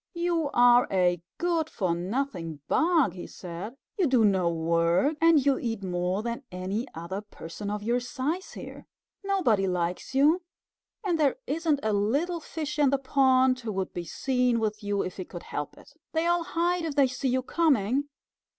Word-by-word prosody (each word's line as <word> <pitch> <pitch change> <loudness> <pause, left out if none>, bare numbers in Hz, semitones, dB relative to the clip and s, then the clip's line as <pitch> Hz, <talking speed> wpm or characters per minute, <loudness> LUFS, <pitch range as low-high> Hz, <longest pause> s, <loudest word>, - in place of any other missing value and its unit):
"You 340 -3 0
are 245 0 +6
a 180 -3 +2 0.2
good 335 -3 0
for 185 -5 -1
nothing 175 - -3
bug," 320 - +3
he 180 - -8
said. 185 +6 -8 0.2
"You 360 - +4
do 250 -4 +4
no 190 -4 +3
work, 170 - +2
and 325 -4 +5
you 275 -2 +3
eat 225 -4 -3
more 180 +2 -1
than 235 +2 -3
any 190 +7 -3
other 170 +5 -5
person 205 -1 -8
of 210 0 -3
your 240 +3 +1
size 285 +9 -3
here. - - -9 0.4
Nobody 290 - +2
likes 180 +6 -2
you, 305 +6 +4 0.6
and 350 -5 0
there 285 -4 +3
isn't 305 0 0
a 215 -1 +1
little 280 - 0
fish 305 -2 -5
in 290 -2 +5
the 275 - +2
pond 260 -1 +3
who 230 -3 -4
would 190 -1 -3
be 175 -1 -4
seen 250 +5 +1
with 215 -1 -2
you 205 -1 0
if 185 - -6
he 185 - -3
could 175 -1 -9
help 145 -1 -5
it. - - -17 0.2
They 320 +1 +1
all 345 0 +2
hide 345 +1 0
if 315 -3 -3
they 280 -2 +5
see 260 +1 -2
you 255 +1 +1
coming. 280 -3 +1
245 Hz, 180 wpm, -27 LUFS, 190-295 Hz, 0.6 s, are